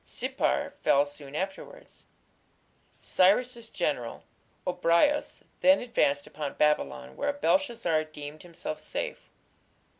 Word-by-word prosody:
Sippar - - -1
fell 140 +1 +4
soon 145 -1 -11
afterwards. 190 +4 -6 0.9
Cyrus's 230 +5 +2
general, 140 -9 -2 0.4
Gobryas, 180 +11 +2 0.2
then 280 +1 +6
advanced 145 - +1
upon 145 -2 -5
Babylon, 65 - +1
where - - 0
Belshazzar 235 - +1
deemed 150 0 -9
himself 170 -3 -6
safe. - - -5
165 Hz, 95 wpm, -28 LUFS, 145-230 Hz, 0.9 s, then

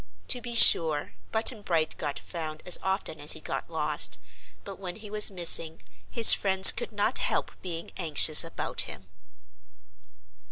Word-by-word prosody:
To 250 - +2
be 240 -1 -7
sure, 155 -9 +4 0.2
Button 220 0 0
Bright 165 -5 -3
got 145 -2 -6
found 155 -2 -10
as 180 - +4
often 190 -4 -6
as 145 +1 -1
he - - -10
got - - -9
lost, - - 0 0.5
but 195 -1 -12
when 180 -2 -9
he 215 -2 -12
was 210 0 +5
missing 165 -3 +1 0.3
his 230 -2 +6
friends 190 -1 +4
could 480 - -7
not - - -2
help - - -3
being 170 -2 -7
anxious 155 -2 +4
about 165 - -5
him. 95 -1 -12
180 Hz, 155 wpm, -24 LUFS, 160-205 Hz, 0.5 s, his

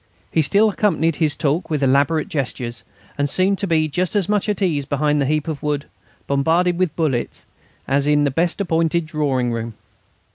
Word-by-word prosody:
He 160 - +2
still 200 +8 +4
accompanied 175 -6 +1
his 155 -3 +1
talk 150 +5 -1
with 150 -3 -1
elaborate 140 +4 +2
gestures, 125 -4 -4 0.4
and 145 0 +1
seemed 190 +5 +1
to 200 - -1
be 160 -2 +2
just 180 +6 -2
as 200 -4 +1
much 210 0 0
at 210 - -1
ease 165 -8 0
behind 145 +1 0
his 135 - 0
heap 155 0 0
of 155 -3 -4
wood, 145 -1 -2 0.4
bombarded 165 +6 +1
with 185 -4 0
bullets, 145 -8 -2 0.4
as 140 +1 +1
in 150 0 +3
the 140 - +1
best 170 +7 0
appointed 165 -2 0
drawing 140 -5 -1
room. 115 -1 -4
155 Hz, 185 wpm, -20 LUFS, 140-170 Hz, 0.4 s, still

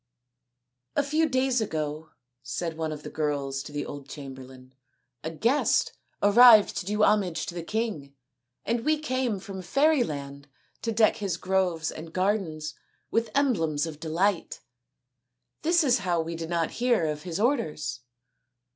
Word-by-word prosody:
" 125 0 -56 0.3
A 290 - +3
few 310 +3 +1
days 260 -2 +1
ago," 155 -4 -3 0.3
said 160 +7 -4
one 160 -1 -3
of 150 -1 -7
the - - -6
girls 140 -3 -2
to 150 - -9
the 145 0 -3
old 140 -1 -8
chamberlain, 130 -2 -10 0.3
" 125 -2 -51
a 160 - -2
guest 230 - +1 0.3
arrived 215 +1 +8
to 180 - -4
do 210 +1 +1
homage 190 -7 +2
to - - -6
the 175 - -4
king, 165 -8 -3 0.5
and 235 0 0
we 310 +1 +2
came 255 -7 -1
from 190 0 -7
Fairyland 175 - 0 0.3
to 230 - -1
deck 220 0 +3
his 195 -5 -2
groves 185 -3 0
and 160 +1 -9
gardens 185 -6 -1 0.4
with 230 +1 +1
emblems 165 - +1
of 155 -2 -7
delight. 170 +4 -1 1.0
This 335 +2 +3
is 255 -4 +3
how 175 -3 0
we 165 +1 -3
did 165 0 -5
not 170 -1 0
hear 240 -8 +1
of 150 -1 -2
his 175 +1 -4
orders." 155 - 0
175 Hz, 155 wpm, -27 LUFS, 150-230 Hz, 1.0 s, arrived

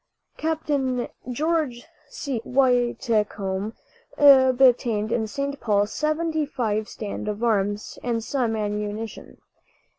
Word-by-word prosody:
Capt. 320 0 -2 0.6
George 300 -3 -1 0.2
C. 265 -6 -4
Whitcomb 225 -6 +1 0.4
obtained 255 -5 +5
in 225 -2 0
St. 280 +4 -3
Paul 205 -2 +2
seventy 310 +6 -1
five 220 -7 -2
stand 210 0 -6
of 210 +2 -3
arms 205 -2 0
and 235 -2 -1
some 240 -3 -1
ammunition. 210 +1 -4
235 Hz, 95 wpm, -24 LUFS, 210-275 Hz, 0.6 s, obtained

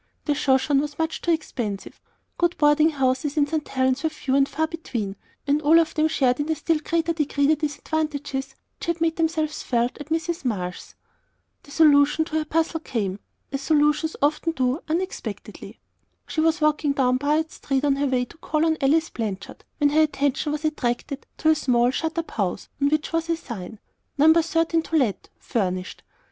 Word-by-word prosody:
The 295 - +2
Shoshone 275 0 +2
was 295 0 -5
much 320 0 -2
too - - -3
expensive; 240 - -3 0.4
good 345 0 +1
boarding 300 +1 +4
houses 270 0 0
in 290 - +4
St. 300 0 -3
Helen's 260 0 +1
were 320 - +1
few 305 -3 -4
and 275 0 +3
far 315 - 0
between, 240 -12 -4 0.3
and 290 +1 +2
all 310 +2 +5
of 325 -1 +1
them 310 0 +2
shared 260 -5 +1
in 290 +2 -2
a 320 - +2
still 320 +1 0
greater 335 +2 0
degree 290 -2 0
the 310 +2 +4
disadvantages 290 -2 -3 0.2
which - - -7
had 340 0 0
made 325 0 0
themselves 315 -2 -1
felt 240 +2 -1
at 295 - -9
Mrs. 325 0 -2
Marsh's. 180 -8 -4 0.7
The - - -19
solution 295 0 +4
to 315 -1 -2
her 310 - -3
puzzle 325 +1 0
came 205 -10 -3 0.3
as 275 0 -3
solutions 300 +1 +2
often 310 +3 +1
do 260 +1 0
unexpectedly. 365 +4 -5 0.5
She 315 - -2
was 320 0 +2
walking 300 -1 +2
down 255 -2 +2
Piute 305 +3 +1
Street 275 0 -2
on 275 -1 +2
her 285 0 +1
way 255 -2 +1
to 320 - -17
call 315 -1 0
on 320 -1 +2
Alice 315 +4 +2
Blanchard, 205 -4 -5
when 290 -2 +3
her 310 +2 +4
attention 285 -1 0
was 300 +1 -3
attracted 275 -2 -2
to 315 - +2
a - - +7
small, 250 -5 +2
shut 320 +4 -3
up 335 - -3
house, 195 -3 -2
on 280 - +4
which 310 +2 -1
was 330 0 -1
a 335 - +1
sign: 220 - -8 0.4
"No. 310 +3 +7
13. 330 0 +2
To 325 - -4
Let, 255 -10 0
Furnished." 185 -6 -3
295 Hz, 190 wpm, -24 LUFS, 265-320 Hz, 0.7 s, a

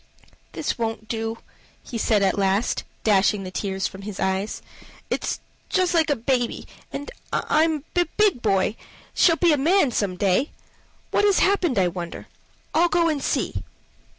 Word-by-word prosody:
"This - - -3
won't 225 -1 -3
do," 225 0 -3 0.5
he 235 - -5
said 210 -2 +2
at 190 - +2
last, 195 +3 +1 0.2
dashing 205 -1 +3
the 185 - -6
tears 190 0 -2
from 195 - -5
his 200 -1 -7
eyes. 190 +2 -1 0.5
"It's - - -1 0.3
just 370 -1 +2
like 330 -2 +3
a 290 - +3
baby, 245 0 -1 0.2
and 285 - -6 0.2
I'm 310 -2 +1
a 350 0 +4
big 415 - +3
boy 200 0 +1 0.4
shall 330 - +5
be 335 -1 +4
a - - +2
man 310 0 +3
some 200 -5 -1
day. 200 - +1 0.6
What - - +2
has 405 -2 +4
happened, 365 - +2
I 185 -2 +4
wonder? 175 -1 -6 0.5
I'll 345 +2 +4
go 340 -1 +3
and 300 -3 -1
see." 105 - -1
230 Hz, 160 wpm, -24 LUFS, 195-320 Hz, 0.6 s, shall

